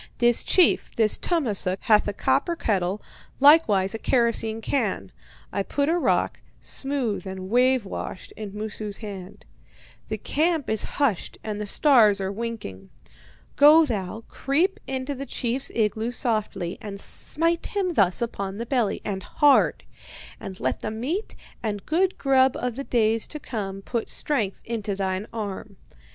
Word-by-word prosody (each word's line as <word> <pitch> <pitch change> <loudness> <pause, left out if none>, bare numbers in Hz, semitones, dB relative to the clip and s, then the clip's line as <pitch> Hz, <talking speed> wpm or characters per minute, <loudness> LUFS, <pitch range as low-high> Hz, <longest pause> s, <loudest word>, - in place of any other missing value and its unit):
"'This 240 -1 +4
chief, 365 -3 +4
this 220 -2 +3
Tummasook, 210 - 0
hath 215 -3 +4
a 205 - -1
copper 340 - +1
kettle, 195 - -1 0.4
likewise 245 -10 +5
a 225 - -4
kerosene 230 -3 +2
can.' 215 - -2 0.4
I 200 - 0
put 285 +8 -1
a 340 - +2
rock, - - 0 0.2
smooth 265 -8 -2
and 190 0 -6
wave 250 -1 +3
washed, 190 - -6
in 210 -2 -7
Moosu's 210 0 -5
hand. 200 -2 -9 0.6
'The - - -3
camp 315 -4 0
is 220 - +2 0.2
hushed 265 - 0
and 210 -1 -4
the 210 - -4
stars 220 -5 +5
are 190 0 -2
winking. 200 - -6 0.7
Go 305 +3 +7
thou, 220 -2 -4
creep 325 +8 0
into 265 +1 -3
the 275 +1 -7
chief's 255 +2 -1
igloo 220 +1 0
softly, 215 -8 -2
and 200 -2 -7
smite 330 +10 -2
him 380 -4 -1
thus 195 - +3
upon 200 -4 -4
the 235 - -4
belly, 240 -4 0
and 195 -2 -3
hard. 290 +6 +3 0.6
And 190 -1 -8
let - - -1
the - - -4
meat 265 - -3 0.3
and 205 -3 -3
good 365 +4 +1
grub 265 -1 +3
of 245 -2 -3
the 275 - -4
days 225 -3 +1
to 300 - -6
come 195 -7 -5
put 235 +1 -3
strength 220 -10 -2
into 215 -4 -3
thine 190 +1 -2
arm. 205 -2 -6
225 Hz, 150 wpm, -25 LUFS, 200-270 Hz, 0.7 s, Go